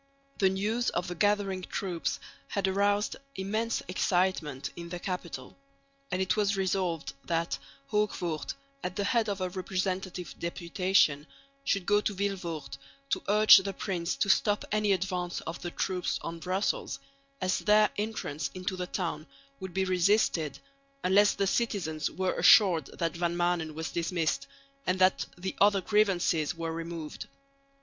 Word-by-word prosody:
The 190 - +5
news 215 +6 0
of 175 - -2
the 175 - -3
gathering 200 0 +1
troops 180 -2 -3 0.3
had 200 -1 0
aroused 205 +2 +1 0.2
immense 215 +4 -1
excitement 175 -7 0
in 170 0 -7
the 175 - -4
capital; 180 -1 -5 0.5
and 180 - -1
it 190 0 +1
was 205 -1 +1
resolved 185 -4 -1
that 170 0 -1 0.3
Hoogvoort, 185 -7 -1 0.3
at 180 - -3
the 205 - -1
head 220 +1 +2
of 200 -1 -3
a 185 - 0
representative 185 -1 -3
deputation, 170 -3 +1 0.4
should 195 -8 0
go 205 +2 +4
to 210 - -2
Vilvoorde 185 -5 -3 0.3
to - - +1
urge 215 +1 +9
the 195 0 -1
prince 180 -2 -2
to - - 0
stop 205 +1 +3
any 210 -1 +2
advance 180 -2 -1
of 165 - -6
the 175 - -3
troops 180 0 -1
on 165 0 -5
Brussels, 185 +4 -1 0.4
as 185 -1 +1
their 210 0 +4
entrance 205 -8 -3
into 185 +1 -3
the 180 -1 -4
town 165 -5 -3 0.3
would 190 -1 -6
be 190 0 +2
resisted, 180 -5 +2 0.5
unless 200 +3 +5
the 200 - +1
citizens 190 -8 0
were 185 -1 -1
assured 175 -9 +6
that 170 -1 -1
Van 170 0 0
Maanen 175 -3 0
was 160 +1 -4
dismissed, 165 -5 -1 0.4
and 180 - +2
that 185 0 +3
the 185 +1 -4
other 200 0 +6
grievances 180 -6 +2
were 165 0 -3
removed. 165 -2 -6
185 Hz, 150 wpm, -29 LUFS, 170-200 Hz, 0.5 s, urge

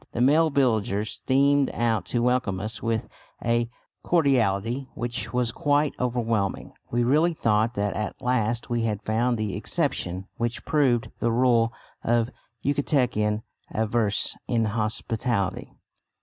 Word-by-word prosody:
The - - -3
male 155 +6 +5
villagers 110 -7 +1
streamed 140 +1 +2
out 115 -5 0
to 120 +2 0
welcome 125 -6 +1
us 110 +3 -4
with 115 -1 -1 0.4
a 120 0 +1 0.3
cordiality 130 - +1
which 120 +1 -3
was 125 -2 +1
quite 145 +1 +1
overwhelming. 115 -5 -1 0.2
We 120 0 +1
really 155 +7 +3
thought 110 -2 +1
that 100 0 -1
at 105 -1 -3
last 120 -3 0
we 120 -1 0
had 105 -3 -2
found 120 +3 +1
the 110 -2 -2
exception 90 +2 -1
which 120 0 -2
proved 130 -7 +2
the 120 - +1
rule 115 -1 +3 0.3
of 120 +1 +1 0.3
Yucatecan 125 -7 +1 0.3
avarice 110 -1 +1
and 115 -2 +1
inhospitality. 110 -2 -1
120 Hz, 130 wpm, -25 LUFS, 110-125 Hz, 0.4 s, male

